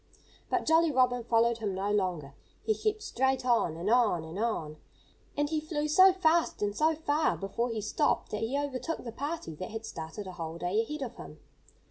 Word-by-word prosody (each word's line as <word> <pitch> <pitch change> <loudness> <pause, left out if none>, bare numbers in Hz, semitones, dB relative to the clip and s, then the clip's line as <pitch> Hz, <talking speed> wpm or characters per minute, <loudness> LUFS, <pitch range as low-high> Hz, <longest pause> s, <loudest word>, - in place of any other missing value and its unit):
But - - 0
Jolly 325 +1 +4
Robin 250 -3 +2
followed 235 0 +2
him 205 -4 -2
no 195 +2 -1
longer. 180 -9 -1 0.3
He 435 - +2
kept 430 0 -2
straight 265 0 0
on, 230 -10 +2
and 175 +4 -4
on, 220 -7 +3
and 160 +4 -7
on. 165 -10 -2 0.6
And 290 0 +2
he 310 +1 -1
flew 300 -1 -2
so 375 +5 +7
fast 340 - +1
and 205 0 -1
so 315 +4 +2
far 305 0 +1
before 230 +5 -2
he 225 -2 -3
stopped 210 - 0
that 210 - -3
he 235 +5 -1
overtook 285 +3 -3
the 235 - -6
party 285 - -4
that 185 - -5
had 225 0 -6
started 165 +3 -7
a 185 - -6
whole 165 -2 -6
day 180 +6 0
ahead 295 +5 -4
of 245 -2 -7
him. - - -10
235 Hz, 200 wpm, -30 LUFS, 195-300 Hz, 0.6 s, so